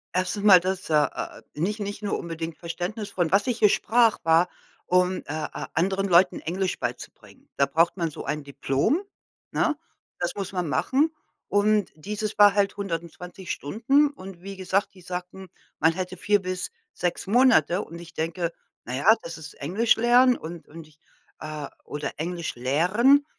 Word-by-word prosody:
1. 185 +3 -1
mal, 190 -4 +9
das 190 +1 -3
äh - - 0
äh, - - -5
nicht 200 +8 -2
nicht 205 +1 -5
nur 205 - -1
unbedingt 165 -1 -5
Verständnis 180 +5 -5
von 175 -4 0
was 200 +1 +4
ich 240 -2 -1
hier 210 - +6
sprach, 230 +2 +3
war, 165 +2 +4 0.4
um, 180 +1 +3
äh - - -6
äh, 155 +1 -4
anderen 190 +4 +1
Leuten 180 +1 +4
Englisch 185 +3 -2
beizubringen. - - -7
Da 140 - +4
braucht 165 +3 +2
man 170 -3 -1
so - - -8
ein 150 -1 -2
Diplom, 140 - 0 0.5
ne? 310 -2 +1 0.4
Das - - -1
muss 195 -1 -4
man 180 -3 -2
machen. 265 - +1 0.4
Und 205 0 +2
dieses 210 +6 -4
war 205 -1 +7
halt 200 -1 +1
120 180 0 -5
Stunden 270 - +2
und 190 -10 -11
wie 195 0 -7
gesagt, 190 +2 -1
die 185 - -16
sagten, 180 +1 -7 0.3
man 160 +2 +4
hätte 185 0 -4
4 205 +2 +2
bis 185 0 -3 0.2
6 175 -1 -2
Monate 205 - +4
und 170 - -10
ich 170 -1 -12
denke: 165 +1 -2 0.3
„Na 125 +2 -4
ja, 205 - +5
das 165 -1 -7
ist 160 0 -10
Englisch 195 +11 +2
lernen 245 +2 +5
und 165 +1 -9
und 160 0 -11
ich 150 -1 -25 0.4
äh, 155 -2 -5 0.2
oder 145 0 -4
Englisch 170 +2 -3
lehren.” 185 - +3
185 Hz, 170 wpm, -25 LUFS, 165-205 Hz, 0.5 s, mal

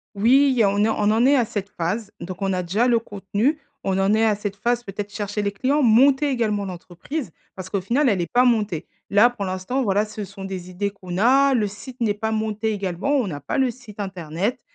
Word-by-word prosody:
Oui 260 +7 +5
il 260 - +1
y 230 - +5
a 200 - +4
on 200 +1 +1
est 220 - +3
on 210 -1 +1
en 225 +3 +3
est 280 +1 +5
à 240 - +3
cette 205 -3 -4
phase, 205 +5 -3
donc 185 +2 -7
on 195 -1 0
a 180 -1 -1
déjà 200 +8 +1
le 235 -1 +4
contenu, 205 +7 -1 0.3
on 190 -1 +1
en 195 +2 +2
est 220 +1 +3
à 215 -2 +3
cette 205 -1 -5
phase, 240 +3 0
peut-être, 200 -1 -6
chercher 205 0 -3
les 200 -1 -1
clients, 275 +8 +1
monter 265 +5 +5
également 215 -6 0
l'entreprise. 185 - -6 0.2
Parce 185 -1 -8
qu'au 200 - -1
final, 255 +8 +2
elle 195 -5 +1
est 170 - -2
pas 245 +1 +4
montée. 210 -9 +1 0.2
Là 210 +4 +6
pour 235 -5 -5
l'instant, 190 +8 -2
voilà, 205 -1 +1
ce 210 0 -7
sont 195 0 -10
des 185 -2 -6
idées 195 +3 -2
qu'on 185 -2 -7
a, 270 +5 +4
le 225 -5 +2
site 245 +5 -11
n'est 215 -3 +2
pas 220 +2 -3
monté 220 0 -1
également, 200 +7 -1
on 245 - 0
n'a 145 -6 -5
pas 145 - -3
le 260 -2 +2
site 225 -4 -10
internet, 190 - -3
210 Hz, 245 wpm, -22 LUFS, 195-240 Hz, 0.3 s, Là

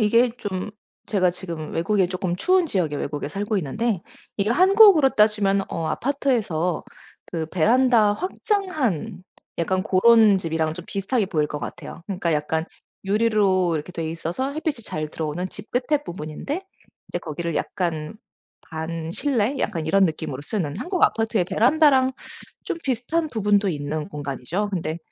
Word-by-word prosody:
이게 230 +3 +4
좀 190 -1 -4 0.4
제가 185 -4 +2
지금 170 -4 -6
외국에 185 +2 +1
쪼끔 185 -1 -2
추운 365 - +2
지역의 170 - -1
외국에 145 -1 -3
살고 205 +6 -2
있는데 190 - -1 0.3
이게 205 +1 0
한국으로 375 - +7
따지면 210 -3 +3
어 165 - -3
아파트에서 225 - 0 0.4
그 160 -2 -3
베란다 220 +5 +4
확장한 295 - -2 0.4
약간 185 +2 0
고런 215 +1 +6
집이랑 160 -3 -1
좀 180 0 -8
비슷하게 200 +2 -1
보일 155 -5 0
것 150 0 -5
같아요. 170 - -8
그니까 180 -4 -1
약간 155 +1 0 0.4
유리로 195 -5 +2
이렇게 155 +4 -6
돼 165 -2 -3
있어서 170 - -3
햇빛이 305 -5 -3
잘 155 -4 -4
들어오는 160 +4 -3
집 205 +3 -10
끝의 270 +4 0
부분인데 155 - -5 0.5
인제 - - -3
거기를 165 +1 -4
약간 165 0 -2 0.5
반실내? 170 - -2
약간 165 -9 -2
이런 195 +4 +4
느낌으로 155 -4 -3
쓰는 150 -4 -3
한국 365 0 -3
아파트의 225 -4 +1
베란다랑 260 - +4 0.5
좀 - - -3
비슷한 275 +6 -1
부분도 205 -4 +2
있는 150 0 -3
공간이죠. 150 +6 -3
근데 165 -2 -2
195 Hz, 335 characters per minute, -23 LUFS, 165-235 Hz, 0.5 s, 한국으로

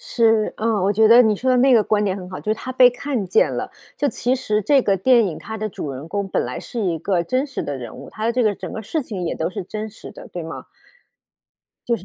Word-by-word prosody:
是， 225 -2 +2
呃， 220 -1 0
我 200 +2 +2
觉 220 +1 +4
得 235 +2 +8
你 220 -3 +3
说 260 +6 -1
的 255 - +4
那 260 +2 +5
个 225 - +5
观 210 -1 +1
点 190 -1 -1
很 180 -2 -8
好， 185 - -6
就 215 - -1
是 - - -1
她 255 +3 -7
被 255 -1 +7
看 245 -4 -3
见 180 - +3
了， - - -4 0.3
就 290 - +1
其 250 -1 0
实 215 -5 -1
这 280 +5 +4
个 195 -2 +2
电 235 +2 +4
影 165 - -5
它 220 +1 -7
的 215 0 -2
主 150 -6 -6
人 135 +4 -8
公 200 +1 -3
本 - - 0
来 125 +1 -5
是 235 - -6
一 175 -6 0
个 180 0 0
真 255 - 0
实 270 - -5
的 140 - -4
人 120 -3 -8
物， - - -10
它 215 - -6
的 230 - +1
这 250 0 +1
个 210 -2 +2
整 - - -8
个 - - -5
事 310 +8 -2
情 205 -7 -6
也 - - -2
都 160 - -2
是 185 - -5
真 215 +3 -6
实 220 - -12
的， - - -12
对 175 - -6
吗？ 160 - -8 1.2
就 235 - +2
是， 185 - -13
215 Hz, 305 characters per minute, -21 LUFS, 190-245 Hz, 1.2 s, 得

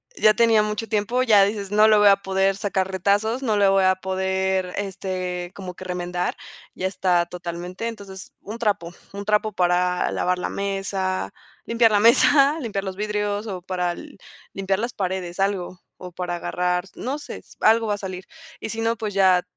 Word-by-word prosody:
ya 215 - +5
tenía 225 -1 +4
mucho 210 +1 -3
tiempo, 220 +4 0
ya 215 -6 +6
dices, 200 -1 -2
no 210 +1 +5
le 215 -1 +6
voy 205 0 +6
a 200 - +8
poder 195 0 0
sacar 195 -2 -1
retazos, 205 +7 +1
no 220 -5 +1
le 200 -1 +4
voy 195 0 +4
a 185 0 +4
poder, 190 0 -1
este, 185 -2 -4
como 185 -2 -8
que - - -9
remendar, 180 -1 -3 0.4
ya 185 - -2
está 180 -2 +1
totalmente. 180 +4 -6
Entonces, 200 -4 -9
un 215 +3 -7
trapo, 205 -7 -1 0.2
un 200 0 -6
trapo 210 +1 +1
para 180 0 +1
lavar 180 0 0
la - - -2
mesa, 195 -1 -2 0.3
limpiar 230 -1 +3
la 205 - +4
mesa, 275 +7 +5
limpiar 205 -6 -3
los 190 -1 -5
vidrios 210 0 -2
o 190 -3 -5
para 180 -1 -2 0.6
limpiar 195 0 -1
las 235 +2 -3
paredes, 185 -2 -3
algo, 195 -2 -1 0.2
o 180 - -9
para 175 0 -4
agarrar, 180 +1 -1
no 270 +4 -4
sé, 290 - -8
s - - -17
algo 225 +1 +4
va 205 - +1
a - - -8
salir. 185 -1 -6 0.3
Y - - -5
si 225 +1 -4
no, 230 +1 +1
pues 215 -2 -4
ya, 185 -2 +4
195 Hz, 185 wpm, -23 LUFS, 185-210 Hz, 0.6 s, a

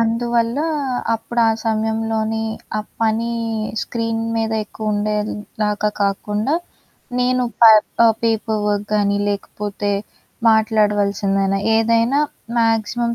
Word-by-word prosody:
అందువల్ల 230 +2 0 0.5
అప్పుడు 235 +1 -2
ఆ - - +4 0.2
సమయంలోనే 220 0 -1 0.4
ఆ - - 0 0.2
పని 225 +1 +1 0.5
స్క్రీన్ 230 -1 -2
మీద 225 -1 -1
ఎక్కువుండేలాగా 210 0 -2
కాకుండా 210 +6 0 0.7
నేను 250 0 +2 0.2
పై 225 -1 +10 0.3
ఆహ్, 225 -1 +5
పేపర్ 220 -1 0
వర్క్ 205 0 0
గానీ 200 -1 +2
లేకపోతే 205 0 -3 0.6
మాట్లాడవాల్సిందైనా, 205 -3 +2 0.2
ఏదైనా 230 +4 +2 0.4
మాక్సిమం 230 +1 +1
220 Hz, 90 wpm, -19 LUFS, 210-230 Hz, 0.7 s, పై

